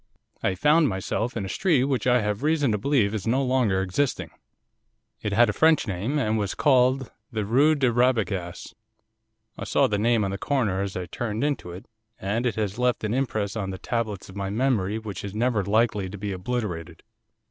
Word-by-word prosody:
I 95 - 0
found 150 - +4
myself 110 +5 -2
in 100 - -3
a - - -4
street 155 - +2
which 130 -4 0
I 125 -1 +4
have 105 +1 -2
reason 150 -4 +2
to 105 - 0
believe 110 -4 +2
is 110 -1 -4
no 130 +4 +2
longer 125 -8 +1
existing. 125 +9 -1 0.9
It 105 - -2
had 120 +4 +5
a 105 - -1
French 160 +3 +4
name, 105 +9 -2
and 110 -5 +1
was 100 -2 -2
called 130 -1 +3 0.2
the 110 -2 -2
Rue 140 +9 +4
de 130 -4 +2
Rabagas, 105 -8 0 0.9
I - - -4
saw - - +2
the 105 -1 0
name 115 -1 +2
on 95 - -2
the 100 - -4
corner 110 -10 0
as 100 -1 -3
I 90 - -3
turned 110 - -3
into 145 -11 -1
it, 90 +3 -9 0.3
and 110 +6 -1
it 120 - -1
has 105 0 -2
left 125 -2 +1
an 110 0 -1
impress 110 -6 -1
on 100 -4 -3
the 95 - -5
tablets 110 -2 -3
of 95 - -12
my 100 -1 -3
memory 110 -3 0
which 110 -4 -6
is 100 0 -6
never 115 -2 +1
likely 105 -1 +1
to 100 - -8
be 100 +1 -4
obliterated. 90 -5 -4
110 Hz, 200 wpm, -25 LUFS, 100-125 Hz, 0.9 s, had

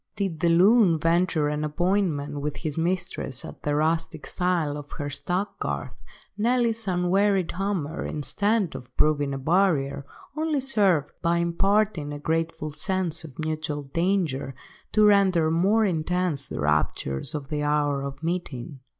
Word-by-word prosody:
Did 195 -6 -2
the 170 - +2
loon 185 +1 +5
venture 165 -1 +2
an 150 0 -2
appointment 150 -3 0
with 150 0 -3
his 155 -4 -4
mistress 175 -6 -2
at - - -10
the 145 0 -1
rustic 160 0 0
style 175 -5 0
of 145 -1 -8
the 145 -2 -3
stack–garth, 175 +8 -3 0.4
Nelly's 230 -1 +1
unwearied 185 +1 +2
hammer, 180 -4 -2
instead 200 - 0
of 125 - -10
proving 145 -2 +2
a 135 - -3
barrier, 150 -2 +1 0.3
only 310 -2 0
served, 200 - +2
by 170 0 +2
imparting 170 -1 +1
a 145 - -5
grateful 160 0 -2
sense 175 +1 -1
of 145 -5 -11
mutual 155 -1 -3
danger, 160 -3 -1 0.4
to 215 0 +5
render 190 -6 +4
more 200 +7 +3
intense 175 -4 -1
the - - -6
raptures 75 - 0
of 145 -2 -5
the 150 -1 -2
hour 145 -1 +1
of 140 +2 -6
meeting. 155 -6 -4
165 Hz, 140 wpm, -25 LUFS, 145-190 Hz, 0.4 s, loon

